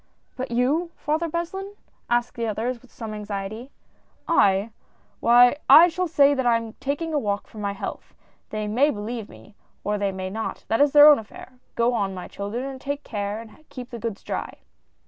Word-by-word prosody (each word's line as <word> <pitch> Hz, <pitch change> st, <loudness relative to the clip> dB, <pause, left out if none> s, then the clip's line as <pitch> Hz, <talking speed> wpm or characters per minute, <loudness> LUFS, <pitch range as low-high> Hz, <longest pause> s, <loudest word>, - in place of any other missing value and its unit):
"But 260 Hz, +1 st, -4 dB
you. 270 Hz, +9 st, +1 dB
Father 315 Hz, +3 st, -1 dB
Beslin?" 385 Hz, +5 st, -4 dB, 0.3 s
asked 240 Hz, 0 st, +1 dB
the 230 Hz, -1 st, -3 dB
others, 230 Hz, +3 st, -2 dB
with 255 Hz, -, -21 dB
some 220 Hz, -2 st, -7 dB
anxiety. 210 Hz, +3 st, -5 dB, 0.4 s
" -, -, -40 dB, 0.2 s
I! 195 Hz, +3 st, 0 dB, 0.5 s
Why 245 Hz, +3 st, +6 dB
I 345 Hz, +2 st, +9 dB
shall 360 Hz, +2 st, -2 dB
say 285 Hz, -3 st, +4 dB
that 260 Hz, -2 st, -1 dB
I 235 Hz, -1 st, +4 dB
am 225 Hz, -1 st, -7 dB
taking 290 Hz, +4 st, -3 dB
a 295 Hz, -, +2 dB
walk 205 Hz, -4 st, -2 dB
for 215 Hz, -, -12 dB
my 200 Hz, -1 st, -2 dB
health. 200 Hz, -, -7 dB, 0.3 s
They 215 Hz, -1 st, -3 dB
may 250 Hz, +8 st, +3 dB
believe 220 Hz, -2 st, -5 dB
me, 205 Hz, -, -15 dB, 0.3 s
or 210 Hz, 0 st, -1 dB
they 200 Hz, -1 st, 0 dB
may 190 Hz, 0 st, -5 dB
not, 220 Hz, +2 st, -5 dB
that 225 Hz, +4 st, +2 dB
is 290 Hz, -1 st, +5 dB
their 295 Hz, 0 st, +9 dB
own 295 Hz, -4 st, +8 dB
affair! 225 Hz, +3 st, -12 dB, 0.2 s
Go 235 Hz, +1 st, +2 dB
on, 195 Hz, -4 st, -1 dB
my 180 Hz, -, -7 dB
children, 210 Hz, +6 st, -5 dB
and 270 Hz, -1 st, -7 dB
take 285 Hz, +1 st, -4 dB
care 205 Hz, -1 st, -4 dB
and 230 Hz, +6 st, -13 dB
keep 250 Hz, -1 st, -9 dB
the 235 Hz, -, -6 dB
goods 225 Hz, -2 st, -5 dB
dry." -, -, -5 dB
235 Hz, 200 wpm, -24 LUFS, 210-285 Hz, 0.5 s, I